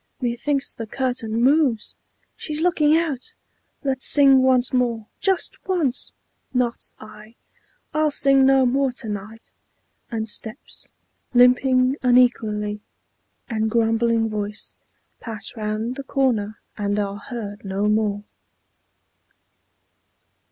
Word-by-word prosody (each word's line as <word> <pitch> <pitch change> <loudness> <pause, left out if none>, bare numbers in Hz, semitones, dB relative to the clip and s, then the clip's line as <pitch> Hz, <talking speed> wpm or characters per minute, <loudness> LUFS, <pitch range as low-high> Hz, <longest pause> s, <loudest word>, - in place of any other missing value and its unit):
_ - - -11
Methinks 270 +4 -1
the 225 - -7
curtain 235 -2 -2
moves! 265 -5 +2 0.4
She's 305 -1 -3
looking 320 -3 +3
out! 305 -7 -3 0.5
Let's 265 -2 +1
sing 275 -2 +6
once 260 -1 +3
more! 240 -3 0
Just 385 -2 +1
once!" 320 -9 0 0.4
"Not 245 -2 -1
I. 215 +1 -13 0.6
I'll 310 0 +2
sing 275 -2 +3
no 265 0 +5
more 265 +2 +1
to 235 - -7
night!" 210 +2 -7 0.6
and 220 -1 -3
steps 220 +4 -5 0.4
Limping 255 +2 +4
unequally, 220 -4 +2 0.7
and 220 -3 -1
grumbling 225 0 +2
voice, 210 -1 -4 0.5
Pass 225 0 -6
round 220 +3 -3
the 275 - -5
corner, 235 -6 0 0.2
and 205 -1 -1
are 200 -1 -2
heard 205 -1 -7
no 195 +1 -2
more. 210 -1 0
240 Hz, 110 wpm, -22 LUFS, 215-265 Hz, 0.7 s, sing